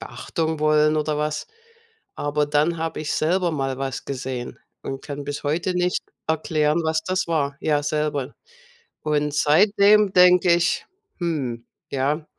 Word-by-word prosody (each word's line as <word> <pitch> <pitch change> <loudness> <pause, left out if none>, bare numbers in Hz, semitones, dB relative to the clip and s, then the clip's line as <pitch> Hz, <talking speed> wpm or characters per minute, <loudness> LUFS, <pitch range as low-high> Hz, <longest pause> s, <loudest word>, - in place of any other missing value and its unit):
Beachtung 160 -2 -3
wollen 155 0 +3
oder 150 0 -1
was. 150 0 -2 0.7
Aber 145 0 0
dann 150 +3 +1
habe 165 0 -3
ich 150 - -3
selber 175 +3 +1
mal 135 -3 -2
was 135 -1 -4
gesehen 130 -2 -5 0.2
und 135 0 -5
kann 145 -1 -6
bis 145 +1 -4
heute 170 +5 -1
nicht 180 0 0 0.3
erklären, 155 0 +1
was 160 0 0
das 185 +1 0
war. 140 -4 -1
Ja, 150 -2 +1
selber. 150 -2 -2 0.7
Und 150 -1 0
seitdem 200 +6 +4
denke 180 0 +6
ich: 170 0 0 0.3
„Hm, 135 -9 -3 0.3
ja." 145 +3 -1
150 Hz, 140 wpm, -23 LUFS, 145-170 Hz, 0.7 s, denke